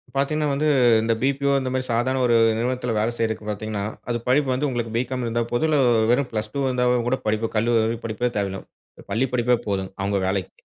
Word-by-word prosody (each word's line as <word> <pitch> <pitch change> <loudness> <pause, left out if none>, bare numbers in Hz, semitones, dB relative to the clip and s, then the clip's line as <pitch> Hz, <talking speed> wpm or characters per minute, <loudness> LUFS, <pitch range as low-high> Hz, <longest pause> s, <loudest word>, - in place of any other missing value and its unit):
பார்த்தீங்கனா 150 +2 0
வந்து, 150 +3 0 0.3
இந்த 115 +1 +1
பி-பி-ஓ 140 +1 +1
இந்த 130 -1 -3
மாதிரி 130 0 -1
சாதாரண 125 +3 +1
ஒரு 120 -1 +3 0.2
நிறுவனத்தில 125 0 -1
வேலை 110 +2 +1
செய்றதுக்கு 110 -2 -2
பார்த்தீங்கனா, 105 0 -3 0.3
அது 120 - 0
படிப்பு 135 +2 +2
வந்து 140 +4 0
உங்களுக்கு 120 -3 -3
பி-காம் 125 +1 -2
இருந்தா 120 0 0
போதும், 120 +6 +1
இல்ல 150 -2 +3 0.3
வெறும் 125 +1 +1
பிளஸ் 110 -1 -3
டூ 140 - -2
வோ - - +1
இருந்தா 125 -1 0 0.2
கூட 130 +2 0
படிப்பு, 110 +1 0
கல்லூரி 115 0 +2
படிப்பே 115 +2 -1
தேவையில்ல, 95 -1 -3 0.5
பள்ளி 120 +6 +1
படிப்பே 125 0 +3
போதும், 95 -2 -2
அவுங்க 100 0 0
வேலைக்கு. 95 -1 -2
120 Hz, 195 wpm, -23 LUFS, 110-130 Hz, 0.5 s, ஒரு